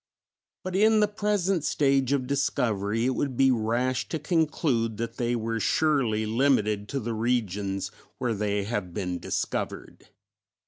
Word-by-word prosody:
But 185 0 -4
in 215 +2 +5
the 210 - +4
present 205 -4 0
stage 135 -3 +2
of 140 -3 +1
discovery 115 -5 0
it 130 - +2
would 130 -2 -2
be 135 -1 +5
rash 120 +2 0
to 160 - -1
conclude 150 - 0
that 115 +1 -4
they 120 0 0
were 115 0 -2
surely 125 -6 +1
limited 110 -3 +1
to 140 - -2
the 115 -1 -3
regions 105 -4 -1 0.3
where 120 -2 -1
they 105 -1 -1
have 100 -5 -4
been 90 -3 -2
discovered. - - -4
120 Hz, 145 wpm, -27 LUFS, 110-140 Hz, 0.3 s, in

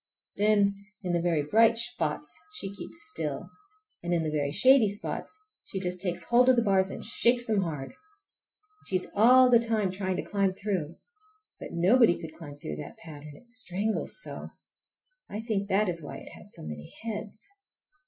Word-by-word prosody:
Then 200 -1 +2 0.2
in 180 -1 -1
the 170 - +1
very 165 -4 +1
bright 225 +9 +4
spots 160 -11 -3 0.2
she 195 -10 -4
keeps 200 - -8 0.2
still, - - -3 0.5
and 175 - -4
in 165 - +1
the 155 - -2
very 145 -2 -1
shady 255 - +6
spots 205 +1 -5 0.3
she 190 - -5
just 180 -1 -1
takes 175 -2 +1
hold 245 +6 +4
of 260 - +6
the 235 - +3
bars 190 -2 +3
and - - -7
shakes 240 +2 +3
them 215 -3 +1
hard. 150 -7 -4
And 420 0 -26
she 190 - -1
is 185 - +1
all 250 +5 +7
the 235 - +7
time 220 -4 +1
trying 190 0 -2
to - - -3
climb 200 -2 +1
through. 185 -5 -3 0.6
But - - -8
nobody 185 +2 +4
could 160 -2 -9
climb 155 -3 -10
through 75 - -6
that - - -8
pattern—it 155 +8 -12
strangles 220 - -1
so; - - -7 0.8
I 210 - -5
think 210 -3 -2
that 205 +2 +3
is 170 -2 -2
why 145 - -7
it - - -11
has - - -12
so - - -11
many 75 -1 -8
heads. 215 - -6
195 Hz, 185 wpm, -28 LUFS, 170-230 Hz, 0.8 s, all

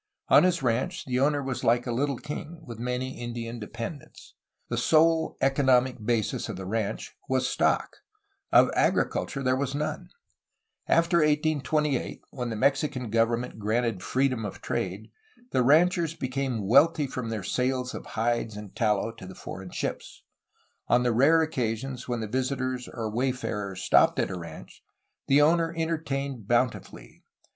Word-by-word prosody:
On - - +8
his 180 -3 +2
ranch 130 +11 -1
the 125 -1 -1
owner 145 +1 +2
was 130 -1 -4
like 120 +1 +3
a 120 - -2
little 135 +2 0
king, 155 +3 -7
with 115 -3 -8
many 125 +2 -3
Indian 120 0 -5
dependents. 115 +6 -8 0.3
The - - -3
sole 160 0 +3
economic 130 -3 +2
basis 115 -1 -1
of - - -4
the 95 - -7
ranch 110 +1 -3
was 130 -1 +1
stock; - - 0 0.5
of - - +6
agriculture 135 - 0
there 130 0 +2
was 135 +1 -2
none. 150 +1 -3 0.8
After 170 +1 +3
1828, 150 -2 +1
when 125 -2 -4
the 115 - -3
Mexican 135 0 0
government 115 +1 0
granted 110 -1 0
freedom 130 +3 0
of 105 - -6
trade, - - -4 0.4
the 130 - +2
ranchers 165 +4 +3
became 130 -6 -2
wealthy 150 +6 +5
from 125 -3 -5
their 110 -3 -3
sales 125 +4 -1
of - - -7
hides 115 -1 0
and 105 -2 -10
tallow 105 -1 +1
to 115 -5 -11
the 95 - -10
foreign 95 -1 -8
ships. - - -5 0.6
On 125 +1 +3
the 120 -1 +2
rare 155 +7 +5
occasions 125 -3 -3
when 120 -3 -2
visitors 130 -1 -2
or 110 -2 -4
wayfarers 110 -6 -2
stopped - - +4
at - - 0
a - - -3
ranch, 85 -2 -11 0.4
the 140 +2 +5
owner 165 +1 +3
entertained 140 -8 -2
bountifully. 120 +1 -1
130 Hz, 150 wpm, -27 LUFS, 115-145 Hz, 0.8 s, On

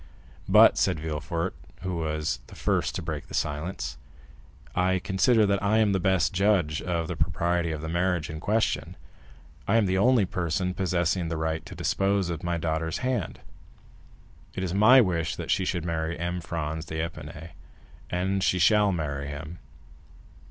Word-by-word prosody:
"But," - - +7
said - - +1
Villefort, 80 +3 -3 0.3
who 90 -2 -2
was 75 -5 -2
the - - -13
first - - 0
to 90 - -3
break 80 -3 -5
the - - -6
silence, 75 -3 -3 0.8
"I 95 +1 +2
consider 105 +5 +3
that 100 -1 +1
I 105 +2 +2
am 110 -2 +3
the 95 - +1
best 95 0 +2
judge 90 -6 +2
of 85 -2 -2
the 90 - -4
propriety 85 +2 0
of 75 -2 -4
the 80 - -5
marriage 85 -1 0
in 80 - -6
question. 110 +6 0 0.7
I 110 - +4
am 110 - +3
the 95 0 +1
only 120 -1 +4
person 90 +1 -1
possessing 90 -1 0
the 80 - -2
right 80 0 -2
to - - -9
dispose 95 -2 0
of 80 - -4
my 85 -1 -1
daughter's 80 0 -2
hand. 125 -9 -2 1.1
It 95 - -3
is 90 -2 -2
my 110 +7 +7
wish 85 -6 0
that - - -4
she 95 - +1
should 90 -2 -2
marry 80 0 -2
M. 85 +1 -3
Franz 80 -1 -4
d'Épinay—and 80 +4 -5
she 90 - +2
shall 105 +3 +4
marry 70 -5 -3
him." 75 +4 -7
85 Hz, 165 wpm, -27 LUFS, 80-95 Hz, 1.1 s, But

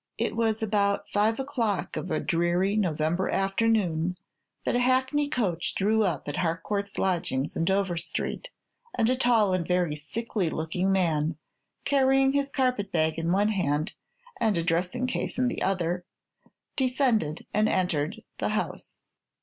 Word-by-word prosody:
It - - -1
was 225 -1 0
about 200 -2 +1
five 215 +3 +2
o'clock 245 -8 -1
of 180 - -4
a - - 0
dreary 175 +3 +1
November 170 -2 0
afternoon 195 -4 +1 0.5
that - - +1
a - - +3
hackney 260 +3 +2
coach 185 - -1
drew 215 +3 +2
op 170 -9 -1
at 145 - -3
Harcourt's 195 +4 -2
lodgings 165 -7 0
in 165 - 0
Dover 190 -1 +1
Street, - - -3 0.5
and 225 +2 +2
a - - +2
tall 235 -6 +3
and 180 -3 -1
very 180 -4 +1
sickly 190 +4 -2
looking 170 +5 -1
man, 160 -5 +1 0.5
carrying 270 -1 +4
his 280 0 +1
carpet 250 -7 0
bag 160 -2 +1
in 165 +1 0
one 205 +3 +3
hand 165 -3 0 0.5
and 220 -5 +2
a 165 - 0
dressing 180 +9 0
case 255 - -2
in 250 0 +2
the - - -4
other, 180 -2 0 0.7
descended 250 - +1
and 215 +1 +3
entered 165 -5 -1 0.2
the - - 0
house. - - -3
195 Hz, 150 wpm, -27 LUFS, 170-230 Hz, 0.7 s, carrying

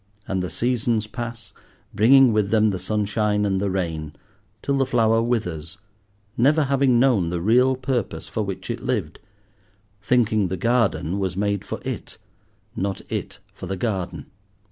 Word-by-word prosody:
And 95 -1 -1
the 90 - -3
seasons 115 +1 0
pass, 115 +1 -7 0.4
bringing 125 +4 +6
with 105 -2 +1
them 110 0 +3
the 95 - -3
sunshine 105 0 0
and 95 -1 0
the 100 - 0
rain, 80 -5 -3 0.5
till 140 - 0
the 135 - +2
flower 115 -2 +3
withers, 90 -8 -2 0.6
never 150 +6 +3
having 135 -3 +3
known 120 -10 +3
the 85 0 -2
real 125 +8 +3
purpose 125 -5 -3
for 110 - -3
which 95 +1 -4
it 115 - -5
lived, 105 -12 -2 0.8
thinking 110 -2 +2
the 95 +1 -3
garden 100 -5 +1
was 95 -2 -2
made 100 -1 0
for - - -5
it, - - -5 0.6
not 95 0 -2
it - - -4 0.2
for 90 - -8
the 95 +1 -3
garden. 95 -3 -3
105 Hz, 155 wpm, -23 LUFS, 95-120 Hz, 0.8 s, bringing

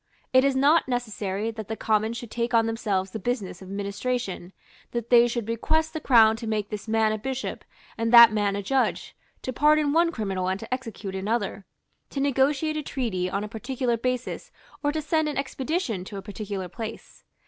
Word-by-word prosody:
It 260 0 +6
is 275 -1 +2
not 285 +4 +4
necessary 220 -4 -2
that 220 -2 -7
the 220 - -3
Commons 220 +1 0
should 240 -3 -8
take 235 0 -1
on 225 -1 +5
themselves 205 -4 -1
the 220 - -5
business 210 -5 -3
of 190 - -10
administration, 200 -1 -3 0.4
that 235 0 -4
they 240 0 +7
should 235 -2 -3
request 315 +8 0
the 315 - -3
Crown 225 -6 +6
to 230 -1 -6
make 215 -1 -2
this 210 +1 -5
man 220 0 +2
a 215 - -2
bishop 265 +3 -4 0.4
and 230 0 0
that 235 -2 +10
man 205 -2 +1
a 200 - -3
judge, 265 +6 0 0.3
to 255 - -3
pardon 300 +1 +3
one 335 +1 +4
criminal 195 - -2
and 190 +1 -1
to - - -5
execute 225 -6 -5
another, 200 0 -2 0.4
to 275 - -4
negotiate 280 +3 +1
a - - -1
treaty 220 -11 -2
on 200 +2 -2
a - - -4
particular 240 +3 -2
basis 255 - -3 0.3
or 290 - +2
to 310 0 -3
send 315 0 +1
an 295 - -4
expedition 270 - -2
to 200 - -7
a - - -5
particular 200 -2 -5
place. 220 +5 -8
230 Hz, 195 wpm, -26 LUFS, 205-265 Hz, 0.4 s, that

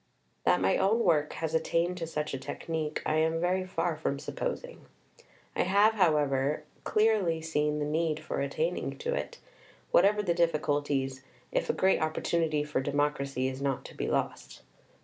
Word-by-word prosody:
That - - +4
my 95 +1 +2
own 215 +5 +2
work 155 -7 +2
has 160 -1 -3
attained 170 +2 +1
to 165 -2 -4
such 150 -2 -3
a 135 - -3
technique 155 +2 -4
I 155 - +1
am 160 +1 +2
very 180 +2 +1
far 170 -2 -1
from 150 -2 -2
supposing. - - -5 0.7
I - - +2
have, 200 +4 +4
however, 150 -6 +2 0.2
clearly 210 -7 +2
seen 150 -2 0
the 150 - -1
need 155 +1 0
for 155 - -4
attaining - - -2
to 475 +1 -2
it, - - -4 0.5
whatever 205 +3 +4
the 175 -4 +1
difficulties, 145 -5 0 0.3
if - - -1
a - - +3
great 190 0 +2
opportunity 155 -1 0
for 150 -3 -1
democracy 140 -2 0
is 130 +1 -5
not 135 -2 -1
to - - -10
be - - -3
lost. - - -3
160 Hz, 165 wpm, -29 LUFS, 145-180 Hz, 0.7 s, That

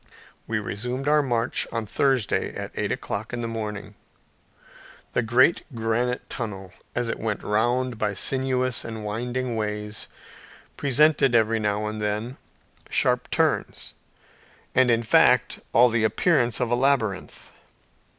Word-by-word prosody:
We 115 - -1
resumed 125 +6 -3
our 150 0 +4
march 120 -3 0
on 115 -1 -2
Thursday 130 0 0
at - - -5
eight - - -2
o'clock 110 +4 -4
in 120 - -3
the - - -2
morning. 105 -3 -5 1.2
The - - +2
great 120 +8 +3
granite 115 +2 -1
tunnel, 95 -6 -6 0.2
as 120 -1 0
it - - -3
went 110 -2 -3
round 120 +3 0
by 105 -2 -1
sinuous 130 +2 0
and 110 -2 -6
winding 120 +3 -3
ways, 105 -1 -3 0.7
presented 140 -2 +3
every 115 0 +3
now 105 0 -1
and 105 0 -4
then 105 +5 -3 0.5
sharp - - +2
turns, - - -1 0.8
and 130 -1 +4
in 115 0 +2
fact 110 - +4
all 120 +3 +6
the 115 -1 0
appearance 120 0 +2
of 120 -1 -1
a - - +4
labyrinth. 120 -7 -1
115 Hz, 135 wpm, -25 LUFS, 105-125 Hz, 1.2 s, all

